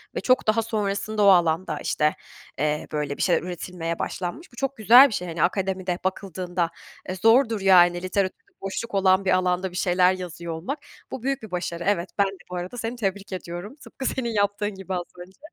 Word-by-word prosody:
ve - - -2
çok 255 -3 +2
daha 215 +1 +3
sonrasında 210 -1 -1
o - - +6
alanda, 170 -4 +3
işte, 150 0 +1 0.4
eee, 150 +1 0
böyle, 150 -2 -2
bir - - -5
şeyler 175 -3 +3
üretilmeye 175 -1 -5
başlanmış. 190 - -4
Bu - - -17
çok 270 +2 -3
güzel 240 +5 +8
bir 245 - -6
şey, 180 -2 -3
hani, 170 0 -1
akademide 185 -1 -1
bakıldığında, 185 -2 -2 0.4
eee, 185 - -2
zordur, 225 +2 +3
yani, 175 -2 +5
literatürde 195 - -2
boşluk 195 +4 -5
olan 190 0 +3
bir 190 - +2
alanda 185 0 +1
bir - - -12
şeyler 180 0 +3
yazıyor 175 -2 -6
olmak. 190 - -4 0.3
Bu 260 - -6
büyük 275 0 -1
bir 220 -3 -10
başarı, 175 -1 -3
evet, 190 -3 +1
ben 200 - +4
de 195 0 -7
bu - - -4
arada 180 +7 -5
seni 230 +1 -3
tebrik 200 -3 -3
ediyorum, 180 +5 -6
tıpkı 270 -2 -9
senin 250 -2 -1
yaptığın 205 0 0
gibi 190 0 -6
az 180 -1 -1 0.2
önce. 190 - -23
190 Hz, 195 wpm, -24 LUFS, 175-215 Hz, 0.4 s, güzel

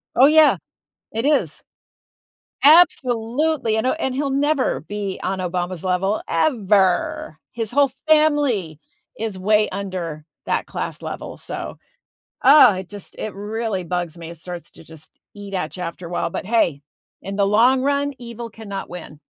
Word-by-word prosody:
Oh, 260 +3 +7
yeah. 310 0 +6 0.5
It 225 +3 -2
is. 295 0 +1 1.0
Absolutely. 265 -4 +4
I - - +3
know. 255 - +1
And 265 -5 -2
he'll 280 +1 -1
never 280 0 +1
be 200 +2 -5
on 190 0 -2
Obama's 180 -1 -3
level 190 +3 0
ever. 190 - +1
His 225 -3 -3
whole 280 +1 +3 0.2
family 290 - +2 0.4
is 220 -3 -3
way 210 +3 +3
under 185 -6 -5 0.2
that - - -1
class - - -5
level. - - -6
So, - - -6 0.7
oh, 265 -5 +8
it 185 -1 -7
just 205 -2 -9
it 215 - -4
really 210 -1 -3
bugs 175 -1 -3
me. 165 -1 -8
It 170 - -10
starts 175 +1 -8
to - - -16
just 160 -1 -15 0.2
eat 200 -1 -9
at 170 -5 -3
you 180 - -5
after 170 0 -6
a - - -10
while. 175 - -1
But, - - -5
hey, 200 -10 +1 0.4
in 195 0 -6
the 200 -1 +2
long 240 +6 +4
run, 285 +1 0
evil 235 -1 -8
cannot 205 -3 -7
win. 165 -4 -9
210 Hz, 160 wpm, -21 LUFS, 180-255 Hz, 1.0 s, oh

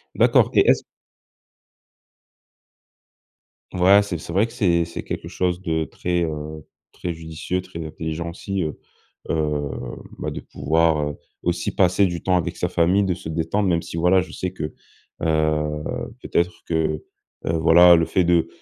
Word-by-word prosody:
D'accord, - - +4
et - - +4
est-ce - - +4 2.9
Ouais, 95 +3 +6
c'est 100 -4 -3
c'est 80 - -8
vrai 100 +6 +2
que 115 - -14
c'est 85 -8 +2
c'est 85 - -7
quelque - - -5
chose 90 0 -1
de 80 -3 0
très, 85 +3 -2
heu, 75 -1 -5 0.3
très 85 -1 -4
judicieux, 80 +3 -4
très 85 -3 -8
intelligent 80 +2 -4
aussi, 95 +1 -3
heu, 75 - -4 0.5
heu, 75 -2 0 0.5
bah, - - -3
de - - -5
pouvoir, 80 +2 +1
heu, 75 - -7 0.3
aussi - - -1
passer 95 +1 +4
du 85 -2 -3
temps 95 -1 +3
avec 85 - -2
sa - - -1
famille, 90 +4 +3
de 95 -2 +1
se 85 - -8
détendre, 85 +5 0
même 85 -2 +2
si 85 -1 -7
voilà, 90 +3 +4
je 90 - -8
sais 90 - -3
que, 75 -5 -5 0.5
heu, 75 -1 +1 0.4
peut-être, 85 +1 -1
que, 80 -2 -1 0.4
heu, 80 - +1
voilà, 85 +2 +7
le 80 - +2
fait 95 - +1
de 85 -1 +3
85 Hz, 160 wpm, -22 LUFS, 80-90 Hz, 2.9 s, voilà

